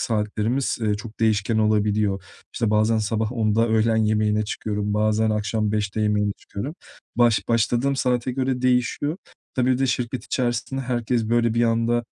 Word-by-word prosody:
saatlerimiz, 110 Hz, +4 st, -1 dB
eee, 105 Hz, -2 st, +1 dB
çok 110 Hz, +1 st, -9 dB
değişken 110 Hz, 0 st, +2 dB
olabiliyor. 105 Hz, -2 st, +1 dB, 0.3 s
İşte, 110 Hz, -2 st, 0 dB
bazen 110 Hz, +1 st, +3 dB
sabah 110 Hz, +2 st, -1 dB
10'da 115 Hz, 0 st, +1 dB
öğlen 110 Hz, 0 st, +2 dB
yemeğine 105 Hz, -1 st, +1 dB
çıkıyorum, 105 Hz, -1 st, -3 dB
bazen 110 Hz, +1 st, +2 dB
akşam 105 Hz, 0 st, -1 dB
5'te 105 Hz, 0 st, -1 dB
yemeğe 105 Hz, -1 st, +1 dB
çıkıyorum. 135 Hz, +11 st, -6 dB, 0.4 s
Baş 120 Hz, -2 st, +3 dB
başladığım 120 Hz, +4 st, +1 dB
saate 125 Hz, -1 st, 0 dB
göre 130 Hz, -1 st, -1 dB
değişiyor. 125 Hz, +5 st, +1 dB, 0.4 s
Tabii, 130 Hz, 0 st, +2 dB
bir 125 Hz, -, 0 dB
de 135 Hz, -, +2 dB
şirket 125 Hz, -1 st, -2 dB
içerisinde 125 Hz, +1 st, -2 dB
herkes 120 Hz, -2 st, -1 dB
böyle 120 Hz, -1 st, +2 dB
bir 120 Hz, -, +2 dB
anda, 115 Hz, +1 st, +1 dB
110 Hz, 155 wpm, -23 LUFS, 105-120 Hz, 0.4 s, bazen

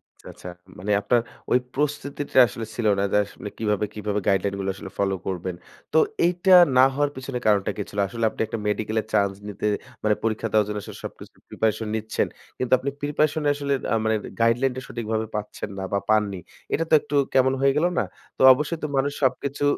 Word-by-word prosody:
আচ্ছা, -, -, -17 dB
আচ্ছা। 90 Hz, -, -9 dB, 0.3 s
মানে 105 Hz, +3 st, -2 dB
আপনার 120 Hz, +1 st, +2 dB, 0.3 s
ওই 125 Hz, -, +5 dB, 0.2 s
প্রস্তুতিটা 145 Hz, -1 st, -2 dB
আসলে 115 Hz, -1 st, -6 dB
ছিল 115 Hz, -3 st, 0 dB
না -, -, +1 dB
যে -, -, +5 dB, 0.4 s
কিভাবে, 105 Hz, -1 st, 0 dB
কিভাবে 105 Hz, 0 st, -2 dB
গাইডলাইন 100 Hz, +1 st, +2 dB
গুলো 95 Hz, 0 st, -2 dB
আসলে -, -, -9 dB
ফলো 95 Hz, -1 st, +1 dB
করবেন। 90 Hz, -1 st, -3 dB, 0.4 s
তো -, -, +4 dB, 0.3 s
এইটা 180 Hz, +2 st, +3 dB, 0.2 s
না 130 Hz, -, +8 dB
হওয়ার 145 Hz, +1 st, +1 dB
পেছনে 130 Hz, -1 st, -5 dB
কারণটা 105 Hz, -1 st, +3 dB
কি -, -, -2 dB
ছিল? 100 Hz, -, -5 dB
আসলে 115 Hz, +1 st, -1 dB
আপনি -, -, -6 dB
একটা 115 Hz, -, -4 dB
মেডিকেল 110 Hz, +1 st, -1 dB
এর -, -, -17 dB
চান্স 100 Hz, -1 st, +2 dB
নিতে 105 Hz, +1 st, -5 dB, 0.4 s
মানে 105 Hz, -1 st, +3 dB
পরীক্ষা 115 Hz, 0 st, -1 dB
দেওয়ার 105 Hz, -1 st, +4 dB
জন্য 105 Hz, 0 st, -3 dB
আসলে -, -, -9 dB
সবকিছু -, -, -10 dB
preparation 110 Hz, 0 st, -1 dB
নিচ্ছেন। 110 Hz, 0 st, -1 dB, 0.3 s
কিন্তু 125 Hz, -, -3 dB
আপনি 140 Hz, -, -2 dB
preparation 150 Hz, +1 st, +1 dB
এ -, -, +5 dB
আসলে 140 Hz, -1 st, -1 dB, 0.2 s
আ -, -, +3 dB
মানে 110 Hz, 0 st, +2 dB, 0.3 s
গাইডলাইনটা 125 Hz, +3 st, +2 dB
সঠিকভাবে 110 Hz, -1 st, -2 dB
পাচ্ছেন 105 Hz, -1 st, -5 dB
না -, -, -3 dB
বা 100 Hz, -, +2 dB
পাননি। 105 Hz, -3 st, +2 dB, 0.3 s
এটা 165 Hz, -, +2 dB
তো -, -, 0 dB
একটু 145 Hz, -, -5 dB, 0.2 s
কেমন 130 Hz, 0 st, +4 dB
হয়ে 135 Hz, 0 st, +5 dB
গেলো 175 Hz, +3 st, +3 dB
না? -, -, +2 dB, 0.3 s
তো -, -, -4 dB
অবশ্যই 150 Hz, +5 st, -2 dB
তো 150 Hz, -, 0 dB
মানুষ 140 Hz, +2 st, +1 dB
সবকিছু 140 Hz, +2 st, 0 dB
115 Hz, 195 wpm, -24 LUFS, 105-140 Hz, 0.4 s, না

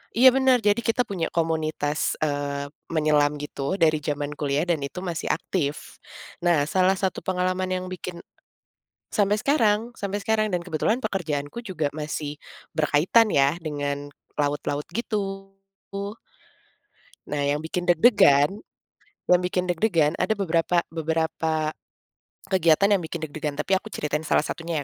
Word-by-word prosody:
iya, 255 Hz, +3 st, +8 dB
bener 260 Hz, -2 st, +3 dB
jadi 205 Hz, +2 st, +3 dB
kita 235 Hz, +1 st, +1 dB
punya 190 Hz, -7 st, -3 dB
komunitas, 155 Hz, -2 st, 0 dB
eee, 145 Hz, -1 st, -2 dB, 0.2 s
menyelam 150 Hz, -2 st, +2 dB
gitu, 145 Hz, +2 st, -3 dB
dari 160 Hz, -4 st, +3 dB
zaman 145 Hz, -1 st, -3 dB
kuliah 145 Hz, +1 st, +1 dB
dan 170 Hz, -3 st, 0 dB
itu 145 Hz, +6 st, -5 dB
masih 170 Hz, -3 st, -3 dB
aktif. 150 Hz, -2 st, -2 dB, 0.4 s
Nah, 170 Hz, -4 st, +3 dB
salah 185 Hz, +3 st, +3 dB
satu 190 Hz, 0 st, -1 dB
pengalaman 185 Hz, 0 st, -1 dB
yang 185 Hz, 0 st, -1 dB
bikin 180 Hz, -1 st, -7 dB, 0.9 s
sampai 205 Hz, 0 st, +2 dB
sekarang, 225 Hz, -4 st, +2 dB
sampe 200 Hz, 0 st, -3 dB
sekarang 215 Hz, -1 st, +1 dB
dan 180 Hz, -, +1 dB
kebetulan 180 Hz, +7 st, 0 dB
pekerjaanku 160 Hz, -4 st, -2 dB
juga 175 Hz, -9 st, -2 dB
masih 150 Hz, -1 st, -4 dB, 0.4 s
berkaitan 160 Hz, +9 st, +4 dB
ya, 140 Hz, +1 st, +4 dB
dengan 145 Hz, -2 st, -3 dB, 0.3 s
laut-laut, 145 Hz, 0 st, -1 dB
gitu. 195 Hz, -4 st, -3 dB, 1.8 s
Nah, 150 Hz, -1 st, -1 dB
yang 145 Hz, +1 st, +1 dB
bikin 175 Hz, +2 st, -3 dB
deg-degan, 160 Hz, -, +5 dB, 0.8 s
yang 180 Hz, 0 st, +5 dB
bikin 180 Hz, 0 st, 0 dB
deg-degan 170 Hz, -4 st, +2 dB
ada 185 Hz, +4 st, +2 dB
beberapa 170 Hz, -2 st, +2 dB
beberapa 160 Hz, -1 st, -1 dB, 0.7 s
kegiatan 185 Hz, 0 st, +4 dB
yang 185 Hz, -, -4 dB
bikin 165 Hz, +1 st, -5 dB
deg-degan 150 Hz, 0 st, -4 dB
tapi 190 Hz, +6 st, +1 dB
aku 205 Hz, -, -5 dB
ceritain 150 Hz, 0 st, -2 dB
salah 155 Hz, -, +2 dB
satunya, 165 Hz, -3 st, -3 dB
165 Hz, 135 wpm, -25 LUFS, 150-195 Hz, 1.8 s, iya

